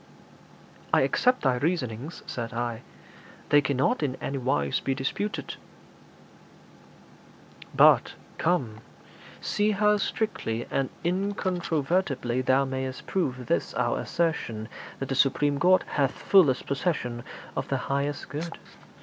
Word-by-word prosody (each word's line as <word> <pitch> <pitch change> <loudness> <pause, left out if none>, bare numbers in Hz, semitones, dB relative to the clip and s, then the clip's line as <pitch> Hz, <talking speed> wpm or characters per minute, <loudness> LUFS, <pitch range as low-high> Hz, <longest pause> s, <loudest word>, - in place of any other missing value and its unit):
'I - - +5
accept 250 0 +2
thy 130 -3 +3
reasonings,' 145 -2 -2
said 115 -1 -5
I; 120 -1 -2 0.7
'they 145 - +6
cannot 140 - +1
in 135 -4 -1
any 135 0 -4
wise 70 - 0
be 135 - -1
disputed.' 175 +10 -3 2.2
'But, - - +6 0.2
come, 135 -11 0 0.6
see 210 +1 +1
how 210 +1 +3
strictly 155 - -2
and 135 -1 0
incontrovertibly 175 -7 0
thou 130 +2 +3
mayst 130 -1 -4
prove 130 -9 -1
this 85 - -1
our - - +1
assertion 120 -10 -2 0.3
that 135 - -5
the - - 0
supreme 140 +1 +2
Godhead 185 +4 +3
hath 140 -2 +2
fullest 155 -10 +4
possession 135 -5 -1 0.3
of - - -2
the - - 0
highest 140 +1 -2
good.' 160 +5 -5
140 Hz, 115 wpm, -27 LUFS, 125-175 Hz, 2.2 s, they